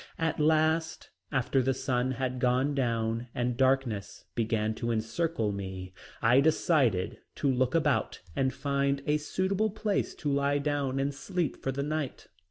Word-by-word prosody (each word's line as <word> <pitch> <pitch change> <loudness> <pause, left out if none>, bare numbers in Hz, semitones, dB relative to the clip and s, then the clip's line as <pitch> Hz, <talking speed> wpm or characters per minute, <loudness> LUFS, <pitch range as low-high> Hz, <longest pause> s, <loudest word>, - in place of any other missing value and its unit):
At 160 -1 -1
last, 160 +1 +2 0.2
after 130 +1 +2
the 130 +1 +1
sun 125 0 0
had 130 -1 -2
gone 125 +3 +2
down 115 -3 0
and 120 0 0
darkness 130 -6 0
began 110 -2 0
to 120 +1 -3
encircle 115 +2 0
me, 95 -2 -6 0.3
I 120 +3 +6
decided 140 - +2 0.2
to 145 - -1
look 130 +1 +1
about 150 -4 +1 0.2
and 130 -1 +1
find 140 0 0
a 150 0 +2
suitable 190 +7 0
place 210 0 -1
to 145 - -2
lie 140 +1 +2
down 140 -2 -1
and 140 +1 0
sleep 155 +3 -3
for 135 - -1
the 140 +2 -2
night. 150 -2 -3
135 Hz, 155 wpm, -29 LUFS, 120-150 Hz, 0.3 s, I